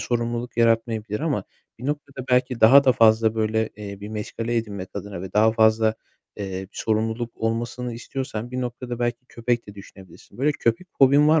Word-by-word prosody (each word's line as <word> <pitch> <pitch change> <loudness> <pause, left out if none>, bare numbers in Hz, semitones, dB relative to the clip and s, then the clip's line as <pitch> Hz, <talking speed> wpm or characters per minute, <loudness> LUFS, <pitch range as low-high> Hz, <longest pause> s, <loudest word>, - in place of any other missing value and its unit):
sorumluluk 120 0 -2
yaratmayabilir. 115 -2 +1
Ama 145 -11 -1 0.3
bir 125 - -6
noktada 140 -3 -4
belki 125 -1 +2
daha 135 +6 +8
da 130 - +5
fazla 110 -1 +4
böyle, 110 0 0
eee, 100 -1 -8
bir 105 - -7
meşgale 115 +2 -3
edinmek 100 -5 -3
adına 100 -3 -6
ve 95 -1 -7
daha 110 +1 +4
fazla, 110 0 +3 0.4
eee, 95 -1 -5
sorumluluk 110 +2 -2
olmasını 120 +2 -2
istiyorsan 120 -1 -5
bir 130 0 -3
noktada 120 0 -5
belki 120 +1 -2
köpek 120 0 -2
de 100 - -10
düşünebilirsin. 95 +1 -14
Böyle 150 +3 +2
köpek 115 +7 -1
fobin 140 +2 +6
var 160 0 +5
115 Hz, 170 wpm, -24 LUFS, 110-125 Hz, 0.4 s, daha